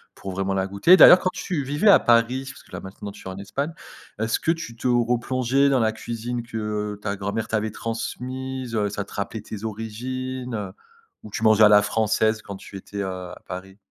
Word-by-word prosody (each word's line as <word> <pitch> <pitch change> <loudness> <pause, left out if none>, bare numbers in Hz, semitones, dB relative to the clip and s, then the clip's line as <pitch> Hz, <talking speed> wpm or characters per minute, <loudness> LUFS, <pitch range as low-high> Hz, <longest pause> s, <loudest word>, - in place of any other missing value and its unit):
pour 95 - -7
vraiment 95 +1 -1
la 95 0 0
goûter. 100 - +6
D'ailleurs, 180 - +10
quand 185 - -1
tu 170 -7 -3
vivais 145 +10 +2
à - - +8
Paris, 120 +3 +3
parce - - -12
que - - -23
là - - -5
maintenant, 100 +1 -8
tu 95 - -12
es - - -4
en 95 - -7
Espagne, 140 +10 -3 0.5
est-ce 110 +1 0
que 165 - +1
tu 165 -9 -5
te 125 - -2
replongeais 125 +3 +2
dans 135 -3 +3
la 110 - +2
cuisine 120 +1 -5
que 105 -2 -3
ta 100 -1 -3
grand-mère 100 +3 -3
t'avait 110 -1 -1
transmise, 125 +3 -5
heu, 105 -2 +1
ça 100 0 -3
te - - -17
rappelait 100 +2 -4
tes 110 +1 -7
origines, 125 +3 -5
heu, 100 -3 -4 0.5
ou 105 - -9
tu 110 - -4
mangeais 110 0 +6
à - - +9
la 105 0 +7
française 110 0 +1
quand 100 -1 -8
tu 95 +1 -10
étais, 100 +1 -8
heu, - - -1
à 90 -1 -7
Paris? 95 +2 -8
110 Hz, 215 wpm, -24 LUFS, 100-125 Hz, 0.5 s, D'ailleurs